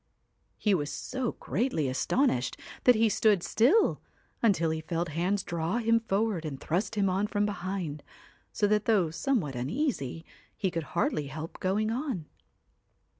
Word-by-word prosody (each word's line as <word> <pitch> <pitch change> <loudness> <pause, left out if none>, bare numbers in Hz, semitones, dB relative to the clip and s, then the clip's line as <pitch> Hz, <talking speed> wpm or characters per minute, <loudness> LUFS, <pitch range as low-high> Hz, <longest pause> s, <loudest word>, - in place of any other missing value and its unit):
He 210 - +2
was 145 -5 0
so 255 - -3
greatly 220 - -1
astonished 130 - +1 0.3
that 250 - +7
he 225 +1 +4
stood 210 -3 +3
still, 285 - +3 0.4
until 175 -8 +3
he 160 0 -2
felt 170 +1 -2
hands 180 +6 0
draw 170 +5 -1
him 230 -1 +3
forward 210 -4 0
and 145 -4 -5
thrust 195 +9 -1
him 200 -2 +2
on 190 +3 +1
from 205 -1 0
behind, 185 -6 -3 0.5
so 210 - +1
that 210 0 +2
though 195 -8 +3
somewhat 160 - 0
uneasy, 160 - -2 0.3
he 190 - 0
could 165 -1 -2 0.2
hardly 150 -3 +1
help 155 +4 -7
going 210 +4 0
on. 245 - -2
195 Hz, 150 wpm, -29 LUFS, 160-225 Hz, 0.5 s, that